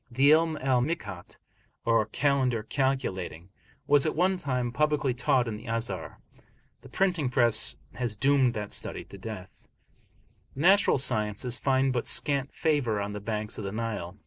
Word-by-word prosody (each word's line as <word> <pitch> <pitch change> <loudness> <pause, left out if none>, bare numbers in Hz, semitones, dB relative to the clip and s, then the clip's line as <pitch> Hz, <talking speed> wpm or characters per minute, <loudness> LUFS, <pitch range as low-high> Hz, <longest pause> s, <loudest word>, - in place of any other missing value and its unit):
The 135 +4 +4
'Ilm 160 0 +3
al 130 -2 +2
Mikat, 100 - -5 0.5
or 115 -2 +2
"Calendar 130 -2 +1
calculating," 105 - -2 0.4
was 145 -1 +4
at - - -1
one 185 +4 +2
time 130 -8 -2
publicly 150 0 +1
taught 130 0 +1
in 110 -2 -4
the 115 +4 -12
Azhar; 115 -6 -3 0.6
the - - -14
printing 180 -8 0
press 120 -3 +2 0.2
has 120 -4 -3
doomed 130 +2 +2
that 105 -1 -5
study - - -4
to 100 - -13
death. 95 -2 -7 1.0
The 135 - -5
natural 195 +1 +5
sciences 120 -1 +1
find 135 -1 +2
but 120 - -1
scant 140 -2 +1
favour 140 -10 0
on 100 0 -3
the 105 - -5
banks 105 +1 -4
of - - -5
the 100 - -4
Nile. 105 -4 -4
125 Hz, 160 wpm, -28 LUFS, 105-140 Hz, 1.0 s, natural